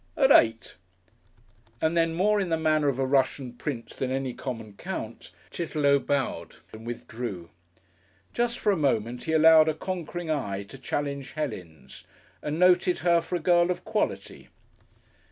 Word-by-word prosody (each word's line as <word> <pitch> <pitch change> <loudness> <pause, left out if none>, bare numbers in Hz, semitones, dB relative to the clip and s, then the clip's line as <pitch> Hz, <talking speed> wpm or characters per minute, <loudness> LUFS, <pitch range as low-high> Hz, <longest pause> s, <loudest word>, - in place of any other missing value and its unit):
"At - - +4
eight." 115 0 +4 1.0
And 160 +1 0
then, 165 -1 +3
and 165 - -5
more 210 +2 +3
in 185 - -2
the 165 - +1
manner 155 -2 +2
of 135 -3 0
a 135 - 0
Russian 130 -1 0
prince 120 -1 -6
than 130 - -2
any 130 -1 -2
common 115 -6 -6
count, - - -7 0.2
Chitterlow 150 -4 +1
bowed 140 -1 -2 0.2
and 110 +1 -10
withdrew. 115 -7 -6 0.8
Just 240 0 0
for 210 - +1
a - - +2
moment 120 - -1
he 160 - -2
allowed 160 0 +7
a 155 - -1
conquering 175 -2 -4
eye 100 -10 -2
to 135 - -11
challenge 140 0 -4
Helen's 90 - -7 0.4
and 150 +1 -3
noted 180 0 +4
her 170 -1 +4
for 170 +2 -4
a - - 0
girl 175 +1 +3
of 180 -1 -3
quality.... 215 -1 -3
145 Hz, 160 wpm, -27 LUFS, 125-170 Hz, 1.0 s, allowed